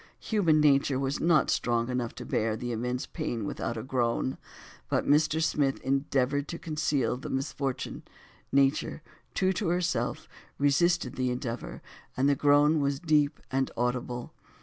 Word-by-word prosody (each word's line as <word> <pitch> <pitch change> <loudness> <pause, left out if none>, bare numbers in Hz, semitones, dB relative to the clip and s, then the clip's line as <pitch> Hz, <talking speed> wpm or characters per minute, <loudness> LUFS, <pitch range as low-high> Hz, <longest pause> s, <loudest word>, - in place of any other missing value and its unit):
Human 175 -8 +2
nature 140 -2 +4
was 135 +1 -1
not 165 -3 +3
strong 120 -1 +1
enough 125 -2 -2
to - - -7
bear 110 0 0
the 120 +1 -4
immense 125 +2 -2
pain 120 - -4
without 115 +3 -3
a 110 - -4
groan; 130 0 -1 0.5
but - - +1
Mr. 150 +2 +3
Smith 140 -4 +1
endeavored 135 +1 0
to 170 - -5
conceal 150 -7 -1
the 130 - -7
misfortune, 135 0 -3 0.5
nature, 140 +2 +1 0.3
true 190 0 +2
to 190 0 -2
herself, 175 +1 -1 0.3
resisted 145 -1 +2
the 130 -1 +1
endeavor, 125 -1 -5 0.3
and 135 +2 +3
the 145 - +5
groan 145 +2 +4
was 140 -1 0
deep 150 -4 +2
and 135 0 +1
audible. 125 0 -2
140 Hz, 150 wpm, -28 LUFS, 125-150 Hz, 0.5 s, the